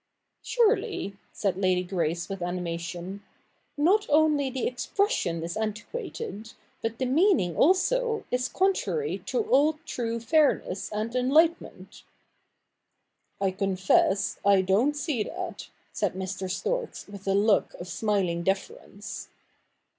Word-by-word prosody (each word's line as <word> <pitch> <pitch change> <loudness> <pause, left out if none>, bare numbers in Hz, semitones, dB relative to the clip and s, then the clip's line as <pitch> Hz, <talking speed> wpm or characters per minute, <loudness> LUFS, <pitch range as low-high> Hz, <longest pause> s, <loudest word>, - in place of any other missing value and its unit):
' - - -54
Surely,' 445 - +1 0.2
said 195 -3 -1
Lady 185 -2 +2
Grace 170 -2 -2
with 195 -2 -6
animation, 175 +2 -4 0.3
' - - -42 0.2
not 370 +9 +3
only 295 -2 +3
the 260 0 -3
expression 250 - 0
is 170 +1 -4
antiquated, 220 - -5 0.3
but 225 0 -3
the 260 - -1
meaning 270 - +3
also 450 - +2
is 250 0 +1
contrary 390 +4 0
to 470 - 0
all 295 -2 +4
true 230 -1 -3
fairness 230 - +1
and 215 +3 -3
enlightenment.' 310 +7 +1 0.7
' - - -54 0.5
I 195 -1 +1
confess, 190 0 +1
I 200 -1 +5
don't 215 +11 +2
see 295 -5 -1
that,' - - -5 0.2
said - - -1
Mr. 190 0 -4
Storks 470 - -3
with 200 -1 -11
a 195 - +3
look 205 +1 +3
of 175 - -8
smiling 185 -3 0
deference. 200 - -4
220 Hz, 125 wpm, -27 LUFS, 190-315 Hz, 0.7 s, I